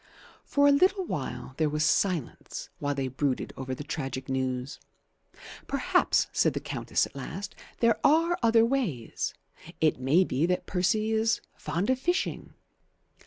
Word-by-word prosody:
For 285 Hz, 0 st, +3 dB
a -, -, +7 dB
little 370 Hz, +6 st, +3 dB
while 135 Hz, -, -5 dB
there 155 Hz, -2 st, +2 dB
was 150 Hz, +1 st, 0 dB
silence 160 Hz, -2 st, -1 dB
while 145 Hz, 0 st, -1 dB
they 135 Hz, -1 st, -1 dB
brooded 130 Hz, +1 st, -2 dB
over 130 Hz, -1 st, -4 dB
the 145 Hz, -, -7 dB
tragic 135 Hz, -3 st, -4 dB
news. 130 Hz, 0 st, -2 dB, 0.9 s
"Perhaps," -, -, +2 dB
said -, -, +3 dB
the -, -, 0 dB
Countess -, -, -1 dB
at -, -, -14 dB
last, 165 Hz, +9 st, -6 dB, 0.3 s
"there 230 Hz, -2 st, +4 dB
are 330 Hz, +3 st, +4 dB
other 230 Hz, -1 st, +5 dB
ways. 230 Hz, -, -2 dB, 0.4 s
It 155 Hz, -4 st, +2 dB
may 140 Hz, +8 st, +4 dB
be 155 Hz, -1 st, 0 dB
that 180 Hz, 0 st, 0 dB
Percy 215 Hz, +4 st, +1 dB
is 220 Hz, 0 st, +2 dB, 0.2 s
fond 170 Hz, -, -1 dB
of 260 Hz, -, 0 dB
fishing." 350 Hz, +7 st, -2 dB
170 Hz, 150 wpm, -28 LUFS, -, 0.9 s, a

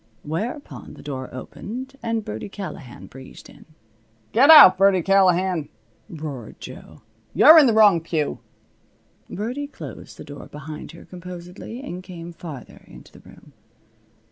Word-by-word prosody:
Whereupon 215 Hz, -, -6 dB
the -, -, -14 dB
door 130 Hz, -3 st, -6 dB
opened 250 Hz, -, -8 dB
and 230 Hz, -1 st, -2 dB
Birdie 110 Hz, -, -6 dB
Callahan 180 Hz, -11 st, -9 dB
breezed 130 Hz, 0 st, -13 dB
in. -, -, -18 dB, 0.7 s
"Get 265 Hz, +7 st, +4 dB
out, 300 Hz, -12 st, +10 dB
Birdie 195 Hz, -2 st, +3 dB
Callahan," 185 Hz, -4 st, +2 dB, 0.4 s
roared 145 Hz, -8 st, -8 dB
Jo. 80 Hz, +6 st, -12 dB, 0.3 s
"You're 320 Hz, +2 st, +9 dB
in 290 Hz, -, +5 dB
the 230 Hz, -, +2 dB
wrong 205 Hz, -6 st, +5 dB
pew." 160 Hz, -3 st, -3 dB, 0.9 s
Birdie 245 Hz, +8 st, -4 dB
closed 290 Hz, -, -11 dB
the -, -, -9 dB
door 145 Hz, 0 st, -11 dB
behind 150 Hz, +2 st, -9 dB
her 170 Hz, -, -14 dB
composedly 180 Hz, +6 st, -10 dB
and 180 Hz, -9 st, -7 dB
came 175 Hz, -2 st, -10 dB
farther 155 Hz, -8 st, -10 dB
into -, -, -15 dB
the -, -, -16 dB
room. -, -, -18 dB
180 Hz, 140 wpm, -22 LUFS, 155-220 Hz, 0.9 s, out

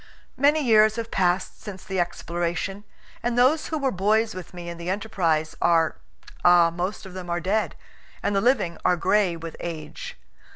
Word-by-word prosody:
Many 290 Hz, +3 st, +3 dB
years 215 Hz, -2 st, +5 dB
have 230 Hz, -1 st, -5 dB
passed 185 Hz, 0 st, 0 dB
since 190 Hz, -3 st, -8 dB
the 190 Hz, -3 st, -3 dB
exploration, 175 Hz, +3 st, -2 dB, 0.4 s
and 240 Hz, 0 st, -1 dB
those 265 Hz, +6 st, +3 dB
who 315 Hz, -, -2 dB
were 275 Hz, -3 st, 0 dB
boys 215 Hz, +4 st, +1 dB
with 185 Hz, -1 st, -8 dB
me 175 Hz, -1 st, -8 dB
in 170 Hz, 0 st, -6 dB
the 170 Hz, +1 st, -4 dB
enterprise 175 Hz, -6 st, 0 dB
are 165 Hz, -2 st, +3 dB, 0.5 s
ah, 175 Hz, -1 st, +6 dB
most 180 Hz, +5 st, -4 dB
of 190 Hz, -, -10 dB
them 185 Hz, -1 st, -7 dB
are 170 Hz, 0 st, 0 dB
dead, 200 Hz, +5 st, 0 dB, 0.5 s
and 200 Hz, 0 st, 0 dB
the 195 Hz, -, +3 dB
living 225 Hz, -8 st, +1 dB
are 180 Hz, -, +3 dB
gray 195 Hz, -1 st, +2 dB
with 165 Hz, 0 st, -8 dB
age. 155 Hz, -3 st, -7 dB
185 Hz, 175 wpm, -25 LUFS, 170-215 Hz, 0.5 s, ah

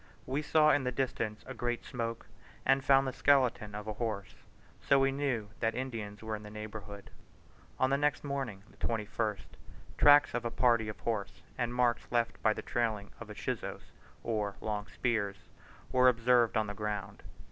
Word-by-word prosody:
We 135 Hz, +3 st, -1 dB
saw 155 Hz, 0 st, +4 dB
in 145 Hz, -, +3 dB
the 125 Hz, -, 0 dB
distance 115 Hz, -4 st, -2 dB
a -, -, -6 dB
great 120 Hz, -1 st, -2 dB
smoke, 115 Hz, -3 st, -4 dB, 0.4 s
and 135 Hz, 0 st, +4 dB
found 135 Hz, 0 st, +5 dB
the 130 Hz, -, -2 dB
skeleton 125 Hz, -7 st, +2 dB
of 105 Hz, 0 st, -6 dB
a 110 Hz, -, -3 dB
horse, 105 Hz, -3 st, -3 dB, 0.5 s
so 140 Hz, -, +4 dB
we 135 Hz, 0 st, +3 dB
knew 135 Hz, -7 st, -1 dB
that 115 Hz, -1 st, 0 dB
Indians 110 Hz, -5 st, -5 dB
were 110 Hz, 0 st, -2 dB
in 105 Hz, -, -8 dB
the 105 Hz, -, -9 dB
neighbourhood. 105 Hz, -1 st, -8 dB, 0.7 s
On 130 Hz, +1 st, +3 dB
the 140 Hz, -, +2 dB
next 145 Hz, 0 st, +1 dB
morning 135 Hz, -9 st, -4 dB, 0.2 s
(21st) 110 Hz, -1 st, -2 dB, 0.5 s
tracks 145 Hz, 0 st, +7 dB
of 120 Hz, -, -1 dB
a 120 Hz, -, -1 dB
party 115 Hz, -2 st, +2 dB
of 105 Hz, -, -7 dB
horse 110 Hz, -4 st, -3 dB
and 120 Hz, -1 st, -1 dB
marks 120 Hz, -1 st, +2 dB
left 120 Hz, -1 st, 0 dB
by 110 Hz, -, +4 dB
the -, -, -4 dB
trailing 110 Hz, -4 st, -1 dB
of 115 Hz, -, -8 dB
the 105 Hz, -, -9 dB
chuzos, -, -, -5 dB, 0.3 s
or 105 Hz, -3 st, -1 dB
long 105 Hz, -1 st, -3 dB
spears, 105 Hz, -6 st, -1 dB, 0.5 s
were 125 Hz, 0 st, +6 dB
observed 120 Hz, -1 st, +3 dB
on 110 Hz, -, +2 dB
the 105 Hz, -, -5 dB
ground. 105 Hz, -2 st, -4 dB
115 Hz, 180 wpm, -32 LUFS, 105-130 Hz, 0.7 s, tracks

